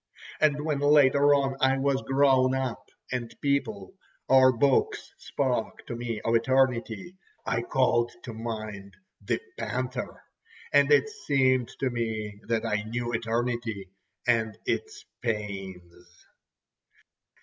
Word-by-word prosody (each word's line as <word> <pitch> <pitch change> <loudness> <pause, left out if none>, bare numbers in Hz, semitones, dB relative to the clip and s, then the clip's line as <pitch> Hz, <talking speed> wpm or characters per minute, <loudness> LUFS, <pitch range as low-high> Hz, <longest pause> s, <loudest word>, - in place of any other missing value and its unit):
And 150 -1 +2
when 150 -3 0
later 145 0 +5
on 135 -1 0
I 135 0 +4
was 135 0 +1
grown 135 -1 +3
up, 130 -2 -4 0.2
and 120 -2 -3
people, 115 -9 -1 0.3
or 130 0 +6
books, 130 +2 +1
spoke - - -2
to - - -5
me 115 -2 -4
of 115 - 0
eternity, 130 - +1 0.3
I 115 - 0
called 120 -1 +1
to 115 - -7
mind 110 -3 -6 0.3
the - - 0 0.2
panther, 125 0 -4 0.5
and 145 0 +5
it 145 +3 +5
seemed 135 - +1
to 130 -2 +1
me 110 -3 -4
that 115 -1 0
I 105 0 0
knew 120 +2 -4
eternity 115 -3 -2 0.3
and 110 -3 +1
its 435 -1 -3 0.2
pains. 95 -6 -6
125 Hz, 120 wpm, -27 LUFS, 110-135 Hz, 0.5 s, or